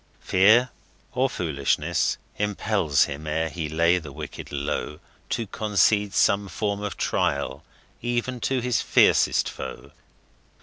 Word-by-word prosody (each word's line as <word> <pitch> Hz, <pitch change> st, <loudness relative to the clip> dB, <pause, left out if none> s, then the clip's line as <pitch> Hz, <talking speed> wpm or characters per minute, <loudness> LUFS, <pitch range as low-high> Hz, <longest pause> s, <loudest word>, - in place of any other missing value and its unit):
Fear, 110 Hz, +6 st, +4 dB, 0.4 s
or 130 Hz, +1 st, +1 dB
foolishness, 80 Hz, -, 0 dB, 0.2 s
impels 105 Hz, -7 st, +1 dB
him, 75 Hz, +2 st, -5 dB
ere 80 Hz, +1 st, -1 dB
he 80 Hz, -1 st, -4 dB
lay 85 Hz, +3 st, +3 dB
the 75 Hz, -4 st, -10 dB
wicked -, -, -8 dB
low, 70 Hz, +1 st, -3 dB, 0.3 s
To 115 Hz, -, -1 dB
concede 105 Hz, -1 st, +1 dB
some 100 Hz, 0 st, +3 dB
form 100 Hz, +1 st, -2 dB
of 105 Hz, -6 st, -4 dB
trial 65 Hz, +3 st, -1 dB, 0.4 s
even 120 Hz, +1 st, -2 dB
to 130 Hz, +1 st, 0 dB
his 125 Hz, 0 st, 0 dB
fiercest -, -, +3 dB
foe. -, -, -8 dB
100 Hz, 125 wpm, -25 LUFS, 80-110 Hz, 0.4 s, Fear